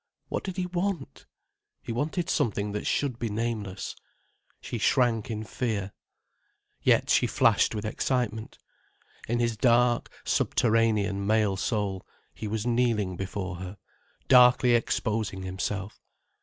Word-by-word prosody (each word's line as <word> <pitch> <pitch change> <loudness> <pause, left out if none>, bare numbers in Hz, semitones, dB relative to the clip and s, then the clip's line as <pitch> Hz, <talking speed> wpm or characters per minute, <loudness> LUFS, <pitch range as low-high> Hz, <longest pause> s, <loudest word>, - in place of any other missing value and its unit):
What - - -2
did 190 -1 -5
he 180 - 0
want? 180 -4 -3 0.6
He - - -5
wanted 155 +8 -1
something 105 -2 0
that 105 - -3
should 130 -5 0
be 115 - -2
nameless. 105 -3 -3 0.6
She 120 - -5
shrank 120 -2 +2
in 110 -1 -3
fear. 105 -3 -3 0.9
Yet - - +3
she - - +4
flashed - - +3
with 105 0 -4
excitement. 110 0 -2 0.7
In 120 - 0
his 120 -1 0
dark, 120 +1 +3 0.2
subterranean 105 -4 +1
male 105 -2 +2
soul, 100 -2 -2 0.3
he 110 - -6
was 110 +1 -2
kneeling 115 -6 +1
before 95 0 -4
her, 95 +2 -7 0.5
darkly 125 -1 +6
exposing 110 -4 0
himself. 95 +2 -4
110 Hz, 125 wpm, -27 LUFS, 100-120 Hz, 0.9 s, darkly